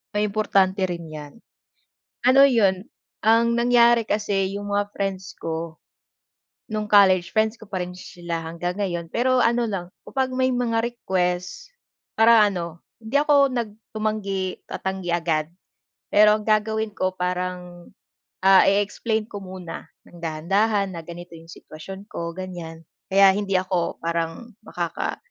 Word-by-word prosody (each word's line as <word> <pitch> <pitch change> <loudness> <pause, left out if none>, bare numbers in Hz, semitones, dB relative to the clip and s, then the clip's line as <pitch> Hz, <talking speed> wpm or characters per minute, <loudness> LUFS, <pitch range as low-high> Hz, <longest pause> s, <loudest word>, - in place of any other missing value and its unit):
Ay 210 - +2
importante 195 -2 +1
rin 170 -1 -5
'yan. 150 -1 -9 1.0
Ano 270 +2 +7
'yon, 200 -7 +3 0.4
ang 230 +1 +4
nangyari 235 -1 +4
kasi 200 -3 -1
'yong 205 0 -5
mga 205 0 -1
friends 190 -1 -4
ko 165 0 -5 0.9
no'ng 215 -2 -4
college 190 -4 +5
friends 220 +1 0
ko 215 - -13
pa 190 - -3
rin 180 - -9
sila 175 -2 -6
hanggang 170 +2 -4
ngayon. 175 -3 -2
Pero 255 +2 +2
ano 235 -1 +2
lang, 185 -3 -3 0.2
kapag 260 -1 -2
may 260 0 +1
mga 240 -2 0
request, 185 - -2 0.5
para 225 0 +7
ano, 170 -5 -1 0.2
hindi 235 +6 0
ako 280 -3 +4
nag 235 -3 -2 0.2
tumanggi 200 -3 -2
tatanggi 190 -2 -4
agad. 160 -3 0 0.6
Pero 210 0 +6
ang 215 - -1
gagawin 220 0 +1
ko 185 0 0
parang, 180 -1 -4 0.6
ah, 195 -1 +8
i-i-explain 210 +2 0
ko 205 -2 -8
muna 185 -2 -8 0.2
ng 170 -1 -15
dahan-dahan 195 +5 0
na 165 - -6
ganito 170 +1 -10
'yong 165 0 -13
sitwasyon 190 +5 -10
ko 170 -5 -5
ganyan. 165 -3 -7 0.2
Kaya 195 0 +6
hindi 195 -2 0
ako 185 -2 -1
parang 170 +7 -4
makaka 175 -6 -4
195 Hz, 140 wpm, -23 LUFS, 175-220 Hz, 1.0 s, ah